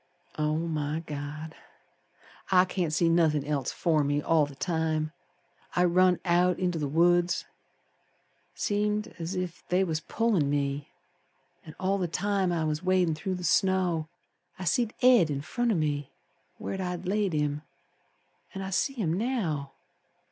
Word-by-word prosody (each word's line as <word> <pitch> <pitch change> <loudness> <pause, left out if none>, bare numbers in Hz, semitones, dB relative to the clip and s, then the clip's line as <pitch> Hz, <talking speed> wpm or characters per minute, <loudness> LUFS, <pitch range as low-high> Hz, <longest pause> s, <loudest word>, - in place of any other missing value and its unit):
Oh, 150 0 +1
my 155 -1 -2
God! 150 +2 -6 1.0
I 185 -1 +6
can't 180 -3 -2
see 165 +2 +2
nothin' 160 -4 +3
else 145 -3 -1
afore 160 -4 +1
me 145 +1 +1
all 150 0 +2
the 140 - -12
time. 155 +1 -1 0.6
I 180 - +4
run 180 0 +4
out 180 +1 +3
inter 180 -3 -1
th' 145 -2 -2
woods, 175 +2 +3 1.1
Seemed 210 +1 0
as 170 +3 -4
ef 180 -1 -4
they 180 +2 +3
was 160 -4 -1
pullin' 205 -6 +1
me; 140 0 -1 0.7
An' 155 - -11
all 195 +1 +1
the 180 - 0
time 195 +1 0
I 165 -2 0
was 155 0 -1
wadin' 185 -3 +2
through 185 +5 -3
the 180 - -6
snow 180 -4 +2 0.5
I 185 - -6
seed 220 +6 +1
Ed 245 -10 +6
in 140 -1 -2
front 240 - -1
of 200 - +1
me 145 -3 -1 0.5
Where 190 - -4
I'd 180 0 -4
laid 200 -1 0
him. 150 -1 0 0.9
An' 195 - -4
I 190 - -5
see 275 +8 +1
him 200 -11 -1
now. 180 - -1
170 Hz, 155 wpm, -28 LUFS, 155-185 Hz, 1.1 s, I